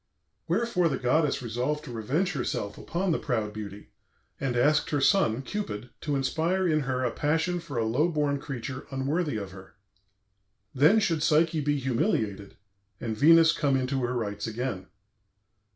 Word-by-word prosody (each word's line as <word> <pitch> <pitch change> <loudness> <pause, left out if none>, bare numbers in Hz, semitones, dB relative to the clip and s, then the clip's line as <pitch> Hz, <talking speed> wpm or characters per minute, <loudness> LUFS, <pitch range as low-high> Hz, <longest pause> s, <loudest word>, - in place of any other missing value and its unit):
Wherefore 180 -1 +1
the 135 - -1
goddess 140 +3 +1
resolved 125 +6 -2
to - - -8
revenge 130 - -1
herself 120 -6 -3
upon 180 +2 -2
the - - +1
proud 110 -5 -2
beauty, 105 -1 -8 0.5
and 130 -3 -1
asked 150 +5 +3
her 150 -3 0
son, 135 - +3
Cupid, 125 - -5
to 145 -2 -1
inspire 165 +7 0
in 155 -2 +2
her 130 -2 -1
a 125 - 0
passion 160 +4 0
for 165 -6 -7
a 115 - +1
low 135 +10 +2
born 145 -3 0
creature 130 -1 -6
unworthy 140 +1 -1
of 100 -2 -6
her. 95 0 -13 1.0
Then 155 +11 +5
should 165 -7 0
Psyche 155 +1 +3
be 145 0 +1
humiliated 110 -6 -1 0.4
and 110 -2 -3
Venus 165 +6 +6
come 140 -4 +1
into 130 +1 -1
her 125 +1 -1
rights 105 -3 -3
again. 110 -4 -4
135 Hz, 160 wpm, -27 LUFS, 120-160 Hz, 1.0 s, Venus